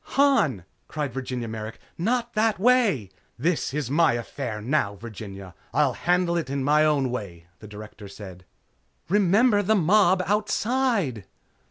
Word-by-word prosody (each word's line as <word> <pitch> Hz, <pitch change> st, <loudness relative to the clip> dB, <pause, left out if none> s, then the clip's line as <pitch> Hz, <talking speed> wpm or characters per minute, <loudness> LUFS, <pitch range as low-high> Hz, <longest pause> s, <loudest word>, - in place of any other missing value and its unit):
"Han!" 220 Hz, -, +3 dB, 0.2 s
cried 145 Hz, -5 st, -4 dB
Virginia 125 Hz, -2 st, -4 dB
Merrick, 110 Hz, 0 st, -7 dB, 0.2 s
"Not 235 Hz, +6 st, -1 dB
that 215 Hz, -2 st, +1 dB
way!" 205 Hz, -, +2 dB, 0.3 s
"This 160 Hz, +4 st, 0 dB
is 140 Hz, -2 st, -3 dB
my 165 Hz, 0 st, +4 dB
affair 120 Hz, -1 st, -4 dB
now, 105 Hz, -3 st, 0 dB
Virginia. 100 Hz, -3 st, -9 dB, 0.2 s
I'll 140 Hz, -3 st, +3 dB
handle 175 Hz, +4 st, +1 dB
it 165 Hz, -5 st, -3 dB
in 140 Hz, -1 st, -2 dB
my 150 Hz, +2 st, +4 dB
own 145 Hz, -5 st, +1 dB
way!" 90 Hz, -9 st, -6 dB
the 110 Hz, -, -11 dB
Director 105 Hz, 0 st, -10 dB
said. 95 Hz, -2 st, -11 dB, 0.7 s
"Remember 205 Hz, +3 st, +3 dB
the 215 Hz, +2 st, +2 dB
mob 185 Hz, 0 st, +3 dB
outside!" 210 Hz, -, 0 dB
150 Hz, 140 wpm, -25 LUFS, -, 0.7 s, my